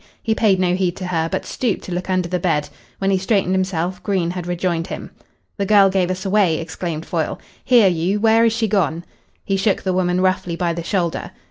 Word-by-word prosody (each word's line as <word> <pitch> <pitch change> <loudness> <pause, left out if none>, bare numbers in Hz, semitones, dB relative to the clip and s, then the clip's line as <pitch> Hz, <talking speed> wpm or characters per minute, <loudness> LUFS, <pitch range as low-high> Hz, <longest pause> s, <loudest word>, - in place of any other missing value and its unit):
He 225 - +1
paid 210 -4 +2
no 180 -1 +2
heed 180 -1 0
to 185 - -6
her, 165 -2 -1
but - - -2
stooped 235 -6 -2
to - - -8
look 180 +2 -3
under 185 -2 +1
the 180 +1 -1
bed. 150 -4 0 0.3
When 195 0 0
he 190 - +2
straightened 190 -1 +1
himself 185 -1 -1
Green 185 -4 0
had 180 -1 -5
rejoined 175 -1 -1
him. - - -7 0.5
"The 200 - -1
girl 200 -2 +6
gave 185 -2 +1
us 185 +1 -3
away," 190 -5 +3
exclaimed 165 -1 -5
Foyle. 165 -3 -2 0.2
"Here, 240 -5 +5
you, 180 +3 0
where 225 +1 +4
is 230 - +4
she 225 0 0
gone?" 170 -5 0 0.4
He 195 - 0
shook 195 +1 +1
the 185 - 0
woman 180 -1 +1
roughly 185 -2 0
by 170 -1 -1
the 170 - -4
shoulder. 170 -1 -2
185 Hz, 220 wpm, -20 LUFS, 175-195 Hz, 0.5 s, girl